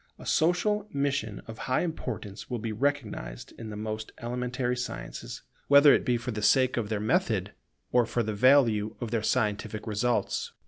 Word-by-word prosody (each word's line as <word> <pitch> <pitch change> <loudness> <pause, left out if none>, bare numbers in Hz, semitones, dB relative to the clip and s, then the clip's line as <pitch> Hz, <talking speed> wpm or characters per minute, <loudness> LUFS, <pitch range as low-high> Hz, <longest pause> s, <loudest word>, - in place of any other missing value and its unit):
A - - -12
social 195 +6 +2
mission 140 -7 -1
of 110 -1 -9
high 130 - +2
importance 115 - -5
will 125 - -2
be 115 0 -4
recognized 110 - -3
in 115 -1 -6
the 105 - -6
most 110 +1 -5
elementary 125 +1 -2
sciences, - - -6 0.2
whether 140 0 +8
it - - +2
be 125 -3 +1
for 120 +1 -4
the 105 -1 -4
sake 130 +4 +4
of 115 -4 -2
their 110 -2 -1
method 110 - +1 0.4
or 120 -2 +3
for 120 - 0
the 110 0 -2
value 115 -3 +4
of 120 -3 -4
their 115 - +1
scientific 105 -2 -1
results. 115 +3 -1
120 Hz, 175 wpm, -28 LUFS, 110-135 Hz, 0.4 s, whether